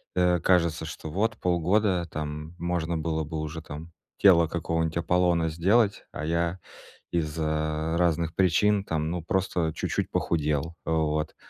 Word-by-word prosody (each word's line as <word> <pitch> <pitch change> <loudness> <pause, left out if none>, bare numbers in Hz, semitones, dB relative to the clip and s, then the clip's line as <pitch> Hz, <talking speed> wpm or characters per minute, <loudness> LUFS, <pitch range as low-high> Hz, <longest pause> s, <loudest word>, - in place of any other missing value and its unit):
э, 90 -1 +3
кажется, 85 -3 +2
что 80 0 -7
вот 110 +6 0
полгода, 90 +1 +1
там, 75 +2 -5
можно 85 -1 -1
было 80 0 -1
бы 80 +1 -5
уже 80 +1 -5
там 80 +2 -9 0.3
тело 85 -4 +6
какого-нибудь 80 0 -1
Аполлона 85 -1 +2
сделать, 100 +6 +2
а 75 - -5
я 85 +2 0 0.5
из-за 80 -1 -1
разных 85 -1 +1
причин, 100 +3 +3
там, 80 -1 -1
ну 90 0 -2
просто 90 -2 0
чуть-чуть - - -2
похудел, 75 0 0
вот. 80 -1 0
85 Hz, 135 wpm, -27 LUFS, 80-90 Hz, 0.5 s, тело